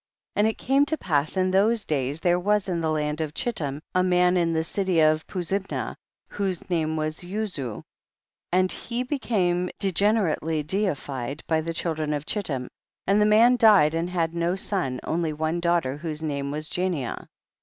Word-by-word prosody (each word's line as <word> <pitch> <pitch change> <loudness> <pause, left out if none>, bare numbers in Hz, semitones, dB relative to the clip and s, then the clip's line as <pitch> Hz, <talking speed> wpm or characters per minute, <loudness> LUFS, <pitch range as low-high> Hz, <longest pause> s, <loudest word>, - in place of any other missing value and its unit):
7. - - -2
And 215 +2 +4
it - - -15
came 275 +2 +3
to 315 - 0
pass 150 - 0
in 185 0 +2
those 210 +4 +3
days 140 0 -1
there 175 0 +3
was 205 +2 +1
in 175 -3 -1
the 160 - 0
land 150 0 -1
of 155 -1 -4
Chiltim 150 - -3
a 185 - +3
man 180 0 +3
in 170 -2 +2
the 160 0 +1
city 185 0 0
of 155 0 +3
Puzimna, 190 +2 -3 0.3
whose 195 -3 -3
name 160 -2 0
was 155 0 -2
Uzu, 180 - -4 0.7
and 185 +1 +3
he 240 +1 -3
became 185 -10 0
de 195 - 0
generately 165 -6 +1
deilied 145 - -2
by 160 -1 +1
the 165 +1 -3
children 155 -3 -1
of 145 0 -3
Chittim, 140 - -2 0.4
and 200 +2 +3
the 210 - +4
man 230 +4 +6
died 205 -10 +6
and 165 +2 -1
had 170 -2 -1
no 170 +1 0
son, 185 -10 -2
only 160 -1 -1
one 160 +3 -1
daughter 170 -6 +1
whose 155 0 -5
name 140 -2 -2
was 155 +2 -4
Jania. 175 -9 -2
170 Hz, 180 wpm, -25 LUFS, 155-195 Hz, 0.7 s, man